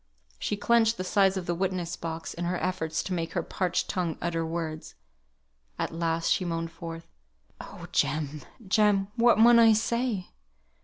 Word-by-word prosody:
She 205 - -2
clenched 230 +1 +3
the 185 - -3
sides 195 0 +2
of 185 - -4
the 175 - -1
witness 180 -1 -2
box 165 0 -5
in 175 - -4
her 180 +1 -1
efforts 160 -4 -2
to 190 - -4
make 165 -2 -3
her 175 - -1
parched 180 +1 -1
tongue 175 -4 -2
utter 165 -1 -1
words. 160 -1 -5 0.8
At - - -3
last 165 0 0
she - - -1
moaned 165 -1 -3
forth, 165 0 -8 0.5
"Oh! - - -9
Jem, 150 -1 0 0.3
Jem! 205 -1 +3
what 235 -1 +4
mun 235 +1 +7
I 225 -1 +7
say?" 230 -2 -1
180 Hz, 165 wpm, -27 LUFS, 165-205 Hz, 0.8 s, mun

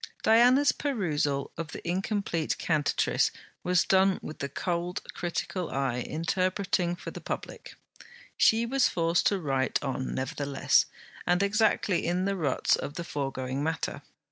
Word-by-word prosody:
Diana's 250 +6 +6
perusal 150 - -1
of 165 -2 -5
the - - -8
incomplete 185 -2 -1
CANTATRICE 155 -3 +1 0.3
was 180 -1 +3
done 190 0 +3
with 155 - -7
the 140 - -3
cold 175 +5 -2
critical 175 0 -3
eye 135 -3 -1
interpreting 180 +4 0
for - - -8
the - - -8
public. - - -6 0.6
She 225 +1 +4
was 260 +1 +3
forced 165 0 +1
to 200 - +2
write 135 -5 0
on 130 -1 -3
nevertheless, 140 +1 +1 0.4
and 180 +2 +3
exactly 205 -2 +2
in 180 +2 0
the 200 0 0
ruts 150 -8 +2
of 145 - -6
the 170 - -4
foregoing 135 -3 -3
matter. 160 -2 -2
175 Hz, 140 wpm, -28 LUFS, 145-195 Hz, 0.6 s, Diana's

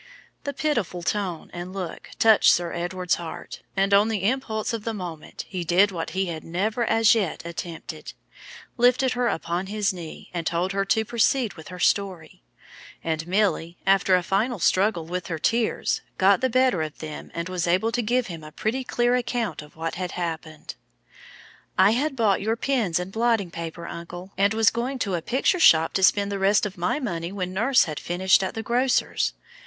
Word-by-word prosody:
The 285 - -2
pitiful 235 - -1
tone 185 -4 -2
and 175 +1 -6
look 185 -4 -6
touched 220 -2 +6
Sir 170 -1 0
Edward's 180 +1 -1
heart, 165 -1 -8 0.2
and, 195 +1 +2
on 200 +2 +6
the 215 -4 -2
impulse 220 -1 -1
of 225 -2 -3
the 225 0 -3
moment, 175 -5 -7
he 185 -2 -4
did 185 +5 +4
what 165 -3 -4
he 190 - +2
had 165 -3 -5
never 210 +8 -1
as 225 0 +5
yet 200 -7 -1
attempted 170 -1 -7 0.6
lifted 250 +2 +4
her 245 -1 0
upon 170 0 -2
his 205 -1 0
knee, 170 -3 -9
and 170 -2 -3
told 175 +3 0
her 195 0 0
to 220 +2 +1
proceed 235 +1 +1
with 160 -3 -12
her 180 - -8
story; 180 - -1 0.6
and 160 0 -2
Milly, 185 -3 0
after 195 -1 +4
a 180 - +1
final 215 +7 0
struggle 185 -1 +2
with 175 +1 -4
her 165 - -3
tears, 230 +7 0 0.2
got 195 0 +4
the 260 - +2
better 255 -7 +3
of 155 -1 -4
them, 155 -1 -7
and 170 +1 -3
was 180 -1 -2
able 185 +6 +2
to 240 +1 0
give 240 +2 +1
him 165 -3 -8
a 155 - -10
pretty 235 +10 -2
clear 240 -1 +1
account 235 -8 -2
of 150 0 -15
what 165 +1 -3
had 180 - -3
happened. 160 -3 -5 1.0
"I 190 +2 +6
had 270 +5 0
bought 215 -6 +2
your 220 +3 0
pens 230 -9 0
and 180 +1 -4
blotting 225 -4 +1
paper, 170 0 -6
uncle, 175 +2 -8
and 200 +2 +2
was 220 -1 +4
going 245 +4 -2
to 200 -6 -2
a 170 - -1
picture 265 - +1
shop 165 - +6
to 190 - 0
spend 200 +1 +3
the 200 - -2
rest 200 +2 +3
of 205 -1 -5
my 180 - -1
money 170 - -3
when 185 -2 -4
nurse 245 +7 +4
had 155 -2 -4
finished 190 +2 +2
at 190 - -3
the 225 - -3
grocer's. 250 +3 +1
195 Hz, 195 wpm, -25 LUFS, 170-225 Hz, 1.0 s, touched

